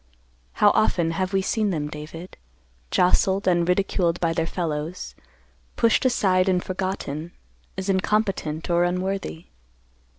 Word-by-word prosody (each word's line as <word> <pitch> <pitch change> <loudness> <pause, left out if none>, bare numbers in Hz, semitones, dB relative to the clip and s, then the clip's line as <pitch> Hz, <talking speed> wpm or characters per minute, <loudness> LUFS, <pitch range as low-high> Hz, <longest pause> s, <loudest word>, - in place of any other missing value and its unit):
How 205 -1 +5
often 170 -6 +2
have 185 +2 -2
we 195 -1 +1
seen 215 +1 0
them, 155 -5 -2
David, 155 +4 -9 0.5
jostled 190 - +2
and 175 -1 +2
ridiculed 180 -2 +1
by 165 -1 +1
their 165 0 -1
fellows, 165 0 -4 0.6
pushed 230 +2 +2
aside 190 -7 +3
and 180 -1 +1
forgotten, 180 -4 -4 0.4
as 190 0 -4
incompetent 195 -5 0
or 170 0 +3
unworthy. 180 -1 -2
180 Hz, 125 wpm, -24 LUFS, 165-195 Hz, 0.6 s, How